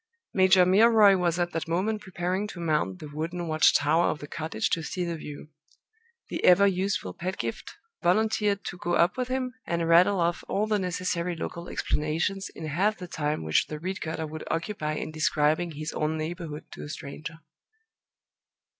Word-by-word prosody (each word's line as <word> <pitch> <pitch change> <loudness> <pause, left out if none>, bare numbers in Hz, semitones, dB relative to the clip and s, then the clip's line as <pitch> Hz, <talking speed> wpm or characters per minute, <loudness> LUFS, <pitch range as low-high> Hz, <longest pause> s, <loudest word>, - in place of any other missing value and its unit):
Major 185 -1 +6
Milroy 210 +1 +6
was 175 -2 +1
at 175 0 0
that 165 0 -3
moment 200 +6 0
preparing 185 +1 -2
to 185 - -9
mount 150 - 0
the 150 - -9
wooden 170 +3 -3
watch 155 0 +4
tower 160 +4 +3
of - - 0
the 145 - -8
cottage 160 +1 -3
to 165 - +1
see 180 +3 -3
the 170 -1 -3
view. 150 -1 -9 0.8
The - - -3
ever 180 +2 +7
useful 190 - 0
Pedgift 150 - -5 0.3
volunteered 205 +2 +1
to 180 - -6
go 175 0 0
up 175 +1 +3
with 255 -1 -2
him, 255 -1 -2
and 170 -1 0
rattle 180 +4 +5
off 170 0 0
all 205 +2 0
the 215 -1 +1
necessary 180 -1 -2
local 170 +1 -6
explanations 165 +6 -1
in 160 - -6
half 190 +8 +1
the 180 - -8
time 150 - -2
which 80 -1 +2
the 155 - -5
reed 185 +5 -4
cutter 160 0 -3
would 155 +1 -7
occupy 165 -2 -2
in 155 - -4
describing 155 +2 +1
his 155 +2 -5
own 155 +1 -1
neighborhood 155 -1 -6
to - - -9
a - - -7
stranger. 155 +3 -7
170 Hz, 180 wpm, -27 LUFS, 155-190 Hz, 0.8 s, ever